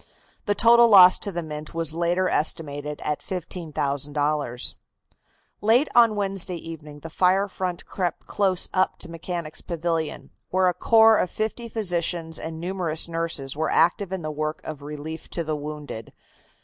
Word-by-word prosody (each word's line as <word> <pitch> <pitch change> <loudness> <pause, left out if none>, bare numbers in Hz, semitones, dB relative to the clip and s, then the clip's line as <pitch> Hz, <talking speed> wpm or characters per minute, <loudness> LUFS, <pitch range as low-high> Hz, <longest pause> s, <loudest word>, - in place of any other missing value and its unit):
The 205 - +2
total 235 +1 +6
loss 185 -3 +8
to 200 - -4
the 175 -2 -4
Mint 150 0 -7
was 165 -2 +1
later 175 +2 +1
estimated 150 -2 -1
at 150 -1 -1
$15,000. 145 -6 -2 0.9
Late 235 +8 +4
on 230 -3 +5
Wednesday 195 -3 0
evening 155 -3 -9
the 165 - -8
fire 190 +4 +2
front 185 -2 -4
crept 180 -4 -3
close 190 -3 0
up 185 0 +1
to 170 - -9
Mechanics' 165 -1 -5
Pavilion, 165 -2 -3 0.2
where 185 0 +2
a - - -1
corps 225 +3 +5
of 180 - 0
fifty 220 +4 -4
physicians 175 -6 -1
and 160 0 -6
numerous 175 -3 +1
nurses 165 -5 -2
were 155 +1 -1
active 185 +2 +2
in 190 -3 -4
the 155 - -3
work 155 +1 -3
of 155 -2 -7
relief 150 +2 -7
to 170 - -3
the 155 -1 -2
wounded. 150 -6 -7
165 Hz, 155 wpm, -24 LUFS, 155-185 Hz, 0.9 s, loss